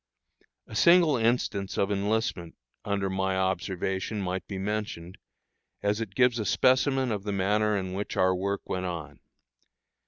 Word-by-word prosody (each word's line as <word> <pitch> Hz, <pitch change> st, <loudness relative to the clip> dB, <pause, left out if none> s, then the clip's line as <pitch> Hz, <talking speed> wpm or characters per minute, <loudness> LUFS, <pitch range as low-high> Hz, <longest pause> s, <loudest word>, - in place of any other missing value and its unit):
A -, -, -13 dB
single 170 Hz, +5 st, +5 dB
instance 115 Hz, -4 st, 0 dB
of 100 Hz, +1 st, +1 dB
enlistment 100 Hz, -3 st, -1 dB, 0.3 s
under 100 Hz, -1 st, -1 dB
my 95 Hz, 0 st, -1 dB
observation 95 Hz, +2 st, -1 dB
might 95 Hz, -1 st, -3 dB
be 100 Hz, -, -5 dB
mentioned, 95 Hz, -3 st, -4 dB, 0.6 s
as 105 Hz, +2 st, +1 dB
it 100 Hz, -4 st, -6 dB
gives 125 Hz, -1 st, +3 dB
a 110 Hz, -, -2 dB
specimen 130 Hz, 0 st, +3 dB
of 105 Hz, -2 st, -2 dB
the 105 Hz, +1 st, -4 dB
manner 105 Hz, +2 st, +1 dB
in 95 Hz, -1 st, -4 dB
which 100 Hz, +2 st, -4 dB
our 95 Hz, 0 st, +4 dB
work 100 Hz, +2 st, -3 dB
went 95 Hz, 0 st, -2 dB
on. 75 Hz, -5 st, -6 dB
100 Hz, 150 wpm, -28 LUFS, 95-110 Hz, 0.6 s, single